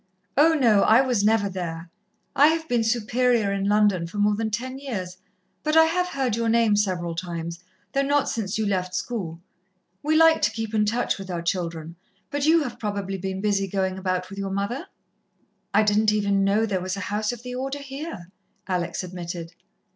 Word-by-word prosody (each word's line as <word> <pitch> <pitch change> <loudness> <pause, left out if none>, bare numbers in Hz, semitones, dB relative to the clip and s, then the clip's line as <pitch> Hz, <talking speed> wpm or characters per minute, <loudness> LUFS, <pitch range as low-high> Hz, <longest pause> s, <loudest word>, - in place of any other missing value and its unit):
"Oh, 320 +3 +5
no, 230 -8 +4
I 225 +4 +6
was 250 -6 +1
never 215 -1 +3
there. 170 -3 -5 0.4
I 285 +2 +7
have 320 0 0
been 240 -4 +1
Superior 230 -1 +1
in 195 0 -1
London 205 -5 +3
for 185 - -9
more 205 0 +3
than 220 +1 -1
ten 255 +5 -4
years, 190 -10 -5 0.4
but 305 +1 +1
I 320 - +9
have 360 +2 0
heard 265 -9 -1
your 230 0 0
name 230 -2 +4
several 180 -5 0
times, 170 0 -5 0.3
though 275 - +2
not 280 0 +2
since 210 -3 -2
you 220 - 0
left 185 -2 -1
school. 180 -6 -4 0.6
We 310 +2 +2
like 325 0 +6
to - - +3
keep 225 -1 -5
in 210 -1 +3
touch 230 0 0
with 195 -1 -8
our 170 -2 -3
children, 170 -2 -3 0.3
but 285 +1 0
you 325 0 +5
have 250 - -6
probably 200 -2 -3
been 190 +1 -4
busy 200 -2 +1
going 190 0 -1
about 185 0 -2
with 195 - -7
your 195 0 -3
mother?" 200 - -3 0.8
"I 210 +2 +4
didn't 210 +1 +3
even 200 -2 +1
know 205 +3 +2
there 195 -4 -1
was 185 +1 -3
a - - -4
house 210 +1 0
of 240 -1 -9
the 250 0 -6
Order 270 +3 -4
here," 270 - -7 0.4
Alex 175 -1 -2
admitted. 175 -2 -6
210 Hz, 195 wpm, -24 LUFS, 185-245 Hz, 0.8 s, I